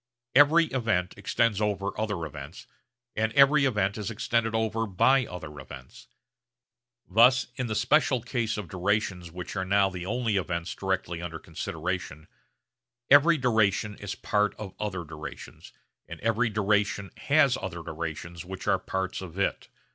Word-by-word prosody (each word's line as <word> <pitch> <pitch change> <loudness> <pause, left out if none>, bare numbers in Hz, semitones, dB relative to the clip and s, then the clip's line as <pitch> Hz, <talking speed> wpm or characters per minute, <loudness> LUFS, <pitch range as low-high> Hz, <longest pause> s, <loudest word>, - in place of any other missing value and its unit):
Every 150 +5 +6
event 110 -8 0
extends 105 +1 0
over 100 -1 0
other 105 -7 -2
events, 75 +1 -9 0.5
and 110 +1 0
every 140 +1 +6
event 105 -5 0
is 105 - -3
extended 115 0 0
over 110 0 0
by 125 +7 +3
other 80 -5 -8
events. 65 -1 -12 1.0
Thus 120 +6 +5
in 125 -2 -2
the 110 - -2
special 130 +2 +3
case 120 -3 -2
of 105 -4 -5
durations 95 0 -1
which 90 +3 -7
are 95 - -1
now 100 +1 +2
the 90 -1 -6
only 115 -1 0
events 85 -2 -2
directly 95 -3 -2
under 85 -2 -5
consideration, 80 -1 -5 0.8
every 155 +4 +7
duration 110 -5 +1
is 100 0 -5
part 105 0 0
of 100 -3 -8
other 95 -4 -3
durations; 80 -1 -10 0.4
and - - -8
every 115 +1 +1
duration 105 -1 0
has 140 -3 +3
other 85 -3 -5
durations 85 +1 -6
which 95 +2 -8
are 100 -2 +3
parts 95 -1 -3
of 90 -1 -9
it. 100 - -1
100 Hz, 145 wpm, -27 LUFS, 90-115 Hz, 1.0 s, every